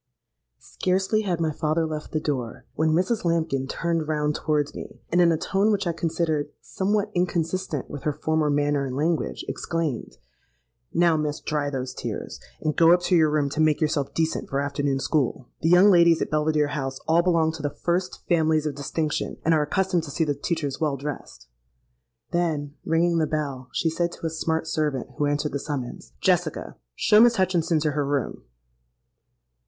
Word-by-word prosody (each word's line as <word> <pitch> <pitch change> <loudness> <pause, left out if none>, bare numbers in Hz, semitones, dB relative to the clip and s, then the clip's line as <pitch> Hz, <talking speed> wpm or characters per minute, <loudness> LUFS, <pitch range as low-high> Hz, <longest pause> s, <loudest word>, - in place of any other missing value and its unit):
"Scarcely 190 +4 0
had 180 -5 -1
my 160 -2 +1
father 155 +2 0
left 155 -1 -5
the 155 - 0
door, 130 -7 -3
when 160 +1 +1
Mrs. 185 +8 +1
Lambkin 160 -6 0
turned 165 +2 -1
round 150 -1 0
towards 150 -1 -1
me, - - -9
and 175 +2 +4
in 170 -1 +5
a 160 - +2
tone 195 +6 +1
which 200 -2 0
I 170 - +1
considered 160 -3 -1
somewhat 205 +2 -1
inconsistent 175 -3 -1
with 145 - -7
her 150 - 0
former 155 +1 0
manner 145 0 +1
and 130 -2 -4
language, 160 +3 -1
exclaimed, 165 -7 -3 0.7
'Now, 170 -1 +3
miss, 150 -1 -2
dry 150 -2 -1
those 130 -2 -4
tears, - - -5 0.2
and 155 -1 -1
go 165 0 +6
up 175 0 +5
to 180 +1 +2
your 160 -2 +5
room 150 -1 +1
to 155 - -1
make 155 -1 +3
yourself 150 -3 0
decent 160 0 -1
for 135 - -1
afternoon 140 -1 -1
school. 135 -3 -1
The 165 - +2
young 180 +4 +7
ladies 170 -2 +5
at - - -2
Belvidere 150 -1 +2
House 135 -2 -3
all 165 +2 +4
belong 165 -3 +2
to 160 -1 -8
the 145 - -1
first 175 +5 -2
families 160 -3 +2
of 150 - -1
distinction, 150 +2 -2
and 165 - +4
are 155 - +3
accustomed 180 +3 +1
to - - -8
see 160 - 0
the 150 -2 0
teachers 145 -1 -3
well 150 -3 +1
dressed.' 135 - -7 0.8
Then, 155 -5 -1
ringing 170 +1 +2
the 155 - +1
bell, 140 -5 -3
she 165 - 0
said 170 +1 -1
to - - -8
a 165 - -1
smart 160 0 -1
servant 150 -5 -1
who 145 - +2
answered 145 +1 -1
the 140 - -2
summons, 135 -4 -6
'Jessica, 175 -4 0 0.2
show 210 - +4
Miss 240 0 +6
Hutchinson 175 -4 +1
to 155 0 +1
her 145 0 0
room.' 140 -1 -2
155 Hz, 185 wpm, -25 LUFS, 145-170 Hz, 0.8 s, young